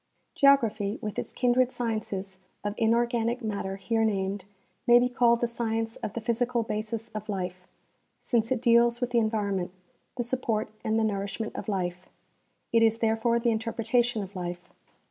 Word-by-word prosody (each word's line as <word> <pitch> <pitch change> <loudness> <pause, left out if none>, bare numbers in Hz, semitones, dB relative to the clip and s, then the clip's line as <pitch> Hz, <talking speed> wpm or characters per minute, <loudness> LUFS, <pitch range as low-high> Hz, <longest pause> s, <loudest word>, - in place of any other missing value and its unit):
Geography, 225 -7 +3
with 210 -1 -4
its - - -5
kindred 250 0 +2
sciences 200 -5 -3 0.2
of 205 0 -1
inorganic 235 +1 +1
matter 200 -3 -3
here 225 +3 0
named, 195 -2 -1 0.4
ma}^ 240 0 +9
be 245 - +3
called 240 -1 +3
the 240 - +2
science 225 -1 -2
of 210 - -5
the 235 - -4
physical 235 +1 0
basis 220 +1 -3
of 215 -1 -7
life, 185 -2 -4 0.5
since 230 -1 0
it 250 -2 0
deals 235 0 +5
with 245 -1 -2
the 240 - +4
environment, 205 -5 0 0.5
the 240 - 0
support 230 -3 -1
and 220 0 +1
the 225 - +2
nourishment 205 +1 -2
of - - -5
life; 180 -2 -3 0.6
it 230 - +5
is 225 0 +4
therefore 225 +1 +2
the 235 0 +2
interpretation 230 0 0
of 195 +1 -10
life. 175 0 -6
225 Hz, 165 wpm, -28 LUFS, 205-235 Hz, 0.6 s, ma}^